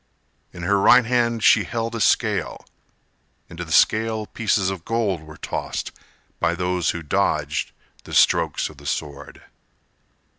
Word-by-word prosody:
In 85 - -9
her 100 +3 +2
right 125 +4 +6
hand 120 -2 0
she - - +5
held 115 0 -4
a 115 - -4
scale; - - 0 0.9
Into 85 +1 -6
the 80 - -10
scale 110 +4 +2
pieces 105 -3 0
of 95 -3 -7
gold 110 -7 -1
were 75 0 -13
tossed - - -4 0.5
By 85 - +1
those 90 -1 -1
who 85 - -3
dodged 75 - -1 0.3
the - - -10
strokes - - +3
of 75 - -14
the 70 0 -11
sword. 75 -1 -5
95 Hz, 145 wpm, -22 LUFS, 85-115 Hz, 0.9 s, right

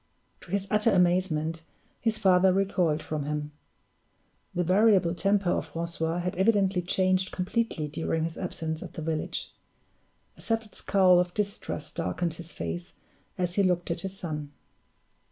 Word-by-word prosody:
To - - -16
his 195 +1 0
utter 210 +1 +3
amazement, 175 -3 +2 0.4
his 220 -1 0
father 190 -2 +5
recoiled 180 -5 +1
from 150 -2 -3
him. 150 0 -3 1.0
The 180 - +2
variable 185 -1 +4
temper 195 0 +1
of - - -1
Francois 165 0 -2
had 180 +1 -2
evidently 195 -2 +3
changed 185 +1 +1
completely 185 -4 -1
during 160 +1 -1
his 165 0 -3
absence 160 -3 -3
at - - -8
the 160 - -6
village. 155 -1 -3 0.8
A - - -13
settled 225 -2 -2
scowl 185 -3 +4
of 180 0 -1
distrust 200 -7 -3
darkened 170 0 -2
his 165 0 -9
face 85 +1 -5 0.4
as 180 -1 0
he 200 - +2
looked 180 -2 +1
at 170 - -2
his 195 +1 -6
son. 150 -5 -5
180 Hz, 150 wpm, -28 LUFS, 160-195 Hz, 1.0 s, father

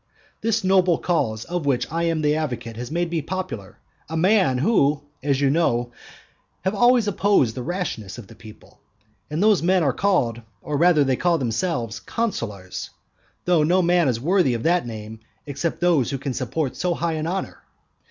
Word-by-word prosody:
This 225 -1 0
noble 185 -3 +3
cause 110 -11 -1
of 175 -4 -3
which 130 -3 +1
I 165 +1 -1
am 165 -2 0
the 150 0 +3
advocate 120 -7 -4
has 120 +2 -6
made 170 +1 -1
me 165 -2 0
popular, 165 - -6 0.3
a 160 - -3
man 185 -6 +3
who 145 - +2 0.2
(as 140 -1 0
you 140 -1 +3
know) 120 -7 +1 0.7
have 190 - -1
always 240 +1 +4
opposed 195 - +2
the 125 - -5
rashness 125 - -4
of 120 - -9
the 105 - -14
people. 110 -1 -15 0.5
And 155 +6 -1
those 215 -3 +4
men 180 +1 +3
are 135 -4 +2
called, 125 - +1 0.2
or 150 - -3
rather 165 -1 +4
they 130 -2 +1
call 175 -1 +2
themselves, 120 -3 -2
consulars; 105 - -4 0.6
though 175 -3 +3
no 180 +4 +3
man 175 -2 +3
is 120 -3 0
worthy 165 -2 +2
of 115 - -4
that 175 -5 +2
name 110 -1 -8 0.3
except 145 +3 -3
those 170 -8 +3
who 140 - -2
can 135 0 -4
support 130 +2 -2
so 180 -1 -1
high 165 0 -1
an 155 0 -3
honour. 190 +3 -4
155 Hz, 180 wpm, -23 LUFS, 125-180 Hz, 0.7 s, always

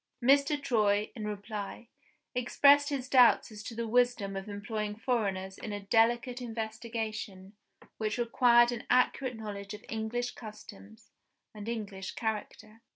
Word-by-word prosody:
Mr. 280 +3 +4
Troy, 210 -6 +1
in 215 -3 -5
reply, 210 +2 -6 0.5
expressed 285 +4 +4
his 270 -3 -3
doubts 250 -3 +5
as 210 -1 -9
to 225 +2 -7
the 230 0 -3
wisdom 240 -4 +1
of 195 +2 -5
employing 210 +1 -4
foreigners 200 -5 -2
in 215 - -6
a 205 - -3
delicate 235 +4 +2
investigation 220 -4 -5 0.4
which 215 0 -2
required 240 0 +4
an 235 -1 -5
accurate 255 0 +2
knowledge 205 -2 -6
of 210 - -14
English 225 +2 -2
customs 110 - -12 0.4
and 210 +1 -7
English 200 -5 -5
character. 220 0 -5
220 Hz, 135 wpm, -30 LUFS, 205-245 Hz, 0.5 s, doubts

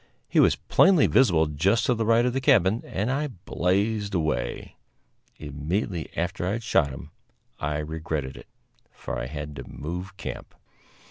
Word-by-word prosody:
He - - +2
was - - +5
plainly 185 -5 +4
visible 95 -10 +4
just 80 +9 +1
to 125 - +3
the 115 -2 -1
right 115 +1 +4
of 125 - 0
the 135 - -1
cabin, 105 -2 +4
and 105 +6 -1
I 145 +3 0
blazed 100 -1 -1
away. 75 -7 -2 0.6
Immediately 80 +4 -3
after 90 +2 -2
I 95 - 0
had 115 +1 -4
shot 70 -8 +2
him 65 - -9 0.5
I 75 0 -1
regretted 75 -3 -4
it, - - -12 0.4
for - - -6
I - - -4
had 75 +1 -6
to - - -8
move 90 +5 -6
camp. - - -7
90 Hz, 160 wpm, -26 LUFS, 75-110 Hz, 0.6 s, was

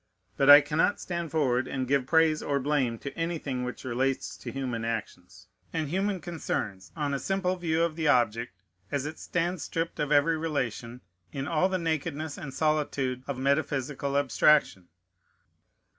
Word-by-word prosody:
But 140 - +3
I 145 0 +12
cannot 150 +7 +1
stand 170 -2 -4
forward, 130 -5 +1
and 130 -2 -3
give 135 -1 +1
praise 160 -1 +3
or 140 -1 0
blame 135 -4 0
to 135 +3 -7
anything 160 -6 -2
which 125 0 -6
relates 130 +2 -1
to - - -7
human 125 -4 -3
actions 95 -5 -5 0.3
and 155 -3 -2
human 190 +3 0
concerns 105 - -4
on 145 -3 -1
a 140 - -1
simple 190 +1 0
view 165 -2 0
of 170 -2 -1
the 160 -1 -1
object, 120 -5 +2 0.3
as 145 -1 -1
it 155 +2 -6
stands 175 -1 -2
stripped 165 0 -3
of 150 0 -1
every 150 +2 +4
relation, 125 -6 -3 0.3
in 135 0 -4
all 170 +3 +2
the 190 - 0
nakedness 160 -2 -2
and 135 - -6
solitude 140 -3 0
of 140 -2 -3
metaphysical 140 0 0
abstraction. 140 -8 +3
145 Hz, 160 wpm, -28 LUFS, 130-160 Hz, 0.3 s, I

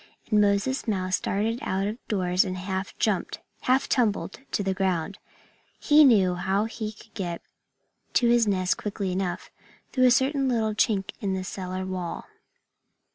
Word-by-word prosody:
And 210 -1 +5
Moses 205 +7 +1
Mouse 185 -3 0
darted 220 +4 -1
out 190 -8 -1
of 215 +4 -3
doors 185 -3 +2
and 185 -1 -4
half 190 +1 -4
jumped, 205 -5 -1 0.2
half 260 +2 +2
tumbled, 215 -6 0
to 205 - 0
the 190 0 0
ground. 190 -1 -1 0.6
He 305 +1 +6
knew 200 -9 +5
how 190 +4 0
he 220 -1 -5
could 215 - -18
get 175 -4 -4 0.7
to 240 - +3
his 235 -1 +4
nest 185 -2 +1
quickly 200 -2 -3
enough, 180 -1 -3 0.4
through 255 -1 +3
a - - +7
certain 265 +2 +2
chink 220 -3 +1
in 195 -2 -1
the 185 - -3
cellar 185 0 -5
wall. 185 -2 -4
200 Hz, 155 wpm, -26 LUFS, 185-225 Hz, 0.7 s, a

